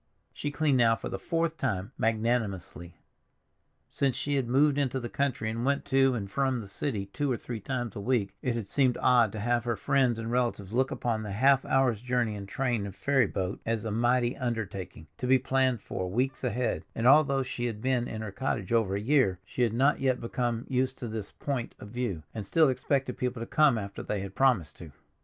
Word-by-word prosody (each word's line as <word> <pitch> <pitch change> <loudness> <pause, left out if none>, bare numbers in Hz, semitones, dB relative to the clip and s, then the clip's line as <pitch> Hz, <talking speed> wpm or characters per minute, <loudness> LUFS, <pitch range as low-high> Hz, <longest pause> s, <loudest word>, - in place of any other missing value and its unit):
She 145 - -3
cleaned 145 -2 +1
now 115 -1 +5
for - - -6
the - - -4
fourth 165 -1 -1
time 95 -1 -2
magnanimously. 110 -6 -1 0.9
Since 135 -3 0
she 145 - -2
had 135 -3 0
moved 140 +3 +3
into 135 -2 0
the 120 -1 -5
country, 135 -5 -1
and 115 +1 -3
went 140 +2 0
to 135 -1 +3
and 100 -4 -3
from 130 +4 0
the 105 - -7
city 100 0 -3
two 140 +8 -2
or 120 - 0
three 120 -1 -6
times 120 0 -4
a - - -4
week, 110 -4 0
it 125 -2 -1
had 115 -4 -4
seemed 130 +1 +2
odd 120 -4 +4
to 110 - -4
have 120 +2 +1
her 120 -1 -1
friends 130 -2 +2
and 115 0 -4
relatives 120 -5 -1
look 130 +2 +2
upon 115 -2 -2
the 105 -2 -5
half 135 +5 +4
hour's 130 -5 +2
journey 125 -3 0
in 100 -1 -7
train 120 -3 -1
and 100 - -9
ferry 135 +3 +2
boat 95 0 -3
as 115 -1 -2
a 110 - -2
mighty 120 +2 +2
undertaking, 100 - -4
to 125 - -2
be 130 +1 +6
planned 130 -3 +1
for 95 -1 -4
weeks 130 +8 -1
ahead; 125 0 -1
and 115 - -2
although 135 0 +5
she 120 -1 -4
had 110 -3 -5
been 125 0 0
in 110 - -5
her 105 - -5
cottage 110 -2 -2
over 110 -4 +2
a - - -1
year, 120 -5 +2
she 125 - -4
had 120 -3 +3
not 135 +5 +3
yet 130 -2 +1
become 120 0 -2
used 130 0 0
to 120 - -5
this 110 -2 -5
point 135 -5 -4
of 105 - -10
view, 110 -9 -3
and 110 - -4
still 160 -3 +4
expected 130 0 -1
people 125 -1 -2
to 115 - -4
come 145 -2 +4
after 100 -2 -5
they 105 -2 -3
had 95 -1 -6
promised 120 - +2
to. - - -10
120 Hz, 220 wpm, -29 LUFS, 110-130 Hz, 0.9 s, be